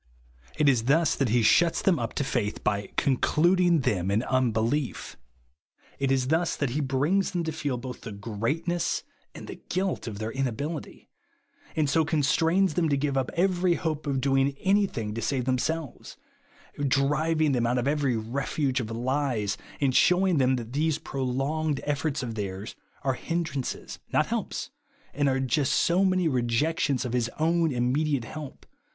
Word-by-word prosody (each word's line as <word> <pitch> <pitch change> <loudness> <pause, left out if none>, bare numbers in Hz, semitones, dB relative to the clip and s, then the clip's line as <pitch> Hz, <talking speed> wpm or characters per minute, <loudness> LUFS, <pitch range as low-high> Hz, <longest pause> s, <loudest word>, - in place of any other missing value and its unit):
It 150 - +3
is 125 -5 +3
thus 155 +4 +3
that 135 -4 0
he 120 +1 +3
shuts 165 +10 +4
them 190 -6 +3
up 115 -1 -3
to - - 0
faith, 120 -6 -2
by 100 -1 -1
"concluding 170 +5 +3
them 95 -6 0
in 105 +4 +1
unbelief." 125 +1 0 0.8
It 135 -1 +1
is 130 -1 +1
thus 165 +2 +1
that 140 -4 -1
he 150 +5 -1
brings 145 +9 +1
them 175 -2 -2
to 160 - -2
feel 145 -4 -2
both 125 +1 -7
the 115 - -7
greatness 115 - -2 0.3
and - - -8
the - - -9
guilt 185 -6 -1
of 105 -3 -5
their 110 +1 -4
inability; 135 +5 -4 0.7
and 155 -2 +2
so 160 +3 +3
constrains 160 +4 +2
them 165 0 +1
to 140 - +2
give 140 0 -1
up 130 -1 0
every 180 0 +2
hope 155 -3 -3
of 135 -2 0
doing 135 +1 +2
any 200 +1 +3
thing 110 - -4
to 115 - -4
save 125 +2 -1
themselves; 135 +3 -2 0.4
— - - -23
driving 150 +3 +2
them 120 -3 +1
out 125 +1 +1
of 125 +2 0
every 140 -5 +1
refuge 135 +4 -1
of 110 -3 -4
lies, 120 -3 -1 0.2
and 135 -2 +2
shewing 180 -2 +4
them 130 0 +3
that 120 -1 -6
these 155 +1 +1
prolonged 135 +3 -2
efforts 145 -1 -1
of 115 -2 -4
theirs 100 0 -5 0.3
are 135 0 +1
hindrances, 155 -2 -4
not - - +3
helps, - - -3 0.4
and 145 0 +1
are 135 0 +1
just 135 +1 +1
so 180 +3 +3
many 185 -2 +2
rejections 130 +1 0
of 120 - -3
his 120 -2 +1
own 165 0 +2
immediate 130 +2 0
help. 150 +1 -9
140 Hz, 170 wpm, -27 LUFS, 125-160 Hz, 0.8 s, shuts